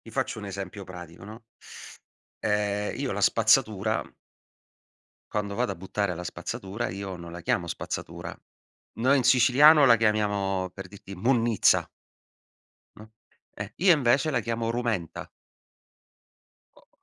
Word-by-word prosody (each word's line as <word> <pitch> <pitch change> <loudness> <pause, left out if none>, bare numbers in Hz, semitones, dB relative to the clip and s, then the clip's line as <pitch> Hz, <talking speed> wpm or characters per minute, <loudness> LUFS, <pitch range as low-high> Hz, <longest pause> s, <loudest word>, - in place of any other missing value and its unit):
ti 115 - -14
faccio 130 -1 -2
un 100 - -7
esempio 100 0 -6
pratico, 90 -2 -11
no? 110 +4 -10 1.0
Ehm, 105 0 0
io 135 -2 -2
la 100 - -3
spazzatura 110 -1 +2 1.2
quando 100 -1 -3
vado 125 +3 -1
a - - -9
buttare 95 +1 -2
la 90 +1 -7
spazzatura, 100 +6 -5
io 95 0 -6
non 85 0 -10
la 85 0 -9
chiamo 85 +1 0
spazzatura. - - -6 0.6
Noi 130 +5 +3
in 125 - -1
siciliano 135 +4 +6
la 120 -3 +7
chiamiamo, 100 -4 0
per 95 -2 -9
dirti, 100 0 -11
munnizza. 115 +2 +2 1.1
No, 110 +1 -14 0.4
eh, - - -7
io 180 -1 +5
invece 135 +1 +2
la 125 -5 0
chiamo 115 0 -2
rumenta. 115 -8 -3 1.5
O - - -23
105 Hz, 130 wpm, -26 LUFS, 95-120 Hz, 1.5 s, la